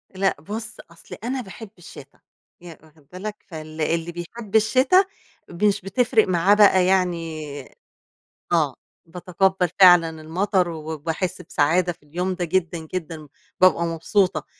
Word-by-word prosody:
لأ 195 Hz, 0 st, +1 dB
بُص 215 Hz, +6 st, -7 dB
أصل 170 Hz, -, -12 dB
أنا 255 Hz, +2 st, -2 dB
باحب 220 Hz, 0 st, -11 dB
الشِتا 175 Hz, -, -14 dB, 0.4 s
ي 175 Hz, -2 st, -11 dB
واخد 155 Hz, -2 st, -23 dB
بالك؟ 205 Hz, +4 st, -6 dB
فال 155 Hz, -2 st, -8 dB
اللي 165 Hz, +2 st, -1 dB
بيحب 195 Hz, +6 st, -8 dB
الشِتا 260 Hz, -, +4 dB, 0.4 s
مش 200 Hz, +3 st, 0 dB
بتفرق 225 Hz, +4 st, +1 dB
معاه 185 Hz, +2 st, +3 dB
بقى 195 Hz, -3 st, +5 dB
يعني 170 Hz, -4 st, 0 dB, 1.1 s
آه -, -, +1 dB, 0.3 s
باتقبّل 180 Hz, +2 st, 0 dB
فعلًا 170 Hz, -4 st, +6 dB
المطر، 180 Hz, +3 st, 0 dB
وباحس 160 Hz, +2 st, -4 dB
بسعادة 165 Hz, +4 st, +1 dB
في 165 Hz, -, -31 dB
اليوم 180 Hz, +5 st, -3 dB
ده 180 Hz, -, -2 dB
جدًا، 175 Hz, 0 st, -1 dB, 0.2 s
جدًا 165 Hz, -4 st, -5 dB, 0.3 s
بابقى 185 Hz, -2 st, +5 dB
مبسوطة. 165 Hz, 0 st, 0 dB
180 Hz, 125 wpm, -22 LUFS, 165-195 Hz, 1.1 s, فعلًا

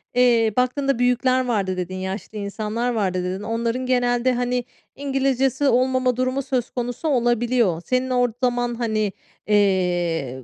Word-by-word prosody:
eee, 235 Hz, -3 st, +4 dB
baktığında 255 Hz, +1 st, +1 dB
büyükler 255 Hz, +1 st, +2 dB
vardı 195 Hz, -6 st, -1 dB
dedin, 185 Hz, +1 st, -4 dB
yaşlı 190 Hz, +3 st, -5 dB
insanlar 215 Hz, +4 st, -2 dB
vardı 185 Hz, -5 st, -1 dB
dedin. 185 Hz, +2 st, -3 dB
Onların 230 Hz, +3 st, -2 dB
genelde, 245 Hz, 0 st, +2 dB
hani, 245 Hz, 0 st, -1 dB, 0.3 s
İngilizcesi 270 Hz, 0 st, 0 dB
olmama 255 Hz, 0 st, +2 dB
durumu 255 Hz, +2 st, 0 dB
söz 260 Hz, -3 st, -2 dB
konusu 245 Hz, +5 st, -4 dB
olabiliyor. 240 Hz, -, +1 dB
Senin 255 Hz, 0 st, 0 dB
o 245 Hz, -1 st, +2 dB, 0.2 s
zaman, 245 Hz, -1 st, +1 dB
hani, 215 Hz, -3 st, -1 dB, 0.4 s
eee, 175 Hz, -9 st, +1 dB
240 Hz, 130 wpm, -22 LUFS, 205-255 Hz, 0.4 s, eee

